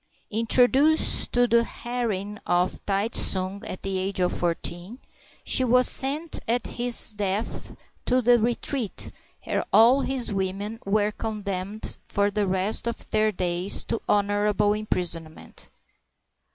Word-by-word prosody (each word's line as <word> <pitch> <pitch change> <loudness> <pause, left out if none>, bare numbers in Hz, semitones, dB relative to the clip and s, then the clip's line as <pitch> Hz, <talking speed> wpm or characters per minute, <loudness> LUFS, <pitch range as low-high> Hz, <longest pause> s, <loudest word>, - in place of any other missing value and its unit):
Introduced 255 +7 +3
to 245 0 +3
the 235 0 +3
harem 220 -4 -4
of 175 +1 0
Tai 200 +2 0
tsung 190 -2 +2
at 185 - -8
the 195 -1 -2
age 190 +1 -3
of 180 -1 0
fourteen, 175 +4 -2 0.5
she 260 - +3
was 250 +1 +5
sent 295 +4 +3
at 235 +1 0
his 240 -2 +2
death 205 +1 -4 0.3
to 255 0 +2
the 245 0 +4
retreat 235 0 -2 0.3
where - - -2
all 240 +5 +5
his 260 -6 -3
women 195 +3 -4
were 205 +1 +1
con 215 -1 -6
demned 200 +2 -5
for 205 0 -1
the 205 -1 -1
rest 190 +5 -1
of 235 - -6
their 215 0 +2
days 180 0 -1
to 230 - -4
honorable 205 0 +1
imprison 175 -6 -3
ment. - - -14
210 Hz, 140 wpm, -24 LUFS, 195-235 Hz, 0.5 s, was